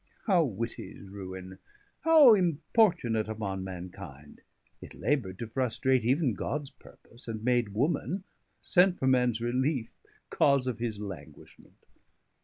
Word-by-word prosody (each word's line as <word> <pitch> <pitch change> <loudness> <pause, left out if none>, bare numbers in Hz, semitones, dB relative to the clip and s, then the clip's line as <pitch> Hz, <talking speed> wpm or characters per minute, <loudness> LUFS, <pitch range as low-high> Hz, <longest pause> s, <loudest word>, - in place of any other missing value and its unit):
How 185 -6 +4
witty's 115 -4 -6
ruine! 95 -1 -8 0.4
how 315 -7 +7
importunate 170 - +2
Upon 100 -3 -4
mankinde! 90 -6 -9 0.4
it - - -11
labour'd 120 -10 -1
to 115 - -5
frustrate 130 +2 0
100 115 - -1
Even 135 -2 +2
Gods 140 +7 -4
purpose; 120 -2 -11
and 110 -1 -5
made 120 -4 +1
woman, 170 - -1 0.4
sent 180 0 +4
For - - -2
mans 125 -3 +2
reliefe, 125 +1 -1 0.4
cause 140 -2 +3
of 125 -3 -3
his 115 -3 -3
languishment. 100 -4 -11
120 Hz, 125 wpm, -29 LUFS, 100-145 Hz, 0.4 s, how